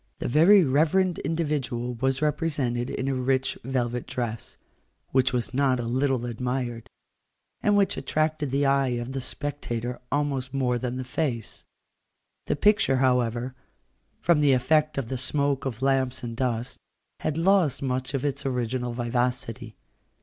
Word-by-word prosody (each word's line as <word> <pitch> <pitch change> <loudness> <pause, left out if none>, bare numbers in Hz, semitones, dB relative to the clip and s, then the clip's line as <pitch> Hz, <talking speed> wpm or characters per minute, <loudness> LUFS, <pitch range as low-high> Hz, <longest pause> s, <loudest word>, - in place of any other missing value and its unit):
The - - -3
very 175 +9 +6
reverend 165 +6 +2
individual 145 -7 -2
was 135 +4 -1
represented 145 -5 0
in 130 - -3
a 135 - +1
rich 130 +1 0
velvet 125 -1 -2
dress, 120 -4 -4 0.5
which 130 0 +3
was 120 -2 -2
not 130 -1 +2
a - - -2
little 130 +1 0
admired, 120 -1 -3 0.7
and 205 -1 +3
which 200 -1 +2
attracted 155 -2 0
the 140 +2 +1
eye 135 -2 +2
of 120 +2 -4
the 135 0 -3
spectator 125 -3 -4
almost 140 -2 -1
more 125 -2 +1
than 125 0 -3
the 130 - -3
face. 125 -3 -3 0.8
The - - +1
picture, 205 -5 +3
however, 125 -1 +1 0.7
from 170 -4 +3
the 145 -2 +5
effect 150 +4 +2
of 135 -4 -1
the 130 - -3
smoke 140 +1 0
of 125 0 -5
lamps 130 -1 +1
and 115 -1 -5
dust, 120 0 -2 0.4
had 155 0 -2
lost 175 -5 +3
much 130 +1 -2
of 135 - -2
its 140 -1 -2
original 125 -2 -2
vivacity. 120 -2 -2
130 Hz, 150 wpm, -26 LUFS, 125-145 Hz, 0.8 s, very